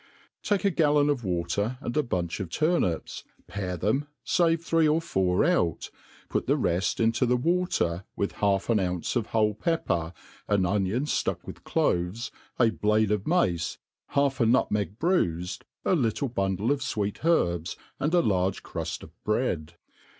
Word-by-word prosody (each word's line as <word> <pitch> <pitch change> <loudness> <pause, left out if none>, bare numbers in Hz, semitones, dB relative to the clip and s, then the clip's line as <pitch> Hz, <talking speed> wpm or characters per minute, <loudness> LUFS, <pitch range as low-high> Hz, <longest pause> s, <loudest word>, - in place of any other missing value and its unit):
TAKE 205 -1 0
a 200 - +4
gallon 150 -3 +3
of 130 -5 -2
water, 100 +6 -1
and 120 -2 -5
a 150 - +4
bunch 90 - -2
pf 95 -4 -4
turnips, 155 - 0 0.2
pare 90 -3 -4
them^ 110 - 0 0.2
fave 170 -5 +3
three 165 -2 +3
or 155 +2 +3
four 95 - +1
out, 160 - +1 0.4
put - - -2
the - - +3
reft 90 +3 0
into 115 +2 +2
the 125 0 +3
water, 125 - 0
with 100 - -1
half 100 -1 0
an 110 - +3
ounce 90 +1 -2
of 115 -3 0
whole 105 -2 +2
pepper, 100 - -1 0.4
an 100 -2 +2
onioA 100 +5 +1
ftuck 150 - -1
with - - -9
cloves, 90 +7 0 0.2
» 115 -3 +1
blade 105 0 +3
of 105 -1 0
mace^ 90 - +1 0.4
half 140 -1 +2
a 115 - +4
nutmeg 105 -5 +1
bruifed, 90 - 0 0.2
a - - +3
little 130 -1 0
bundle 100 +1 0
of 145 - +1
fwee( 105 -6 -3
herbs, 85 - +1 0.2
and 155 +5 +1
a 175 - +5
large 95 -2 0
cri^ft - - -5
of - - -12
bread. 90 -8 -1
110 Hz, 165 wpm, -27 LUFS, 90-145 Hz, 0.4 s, a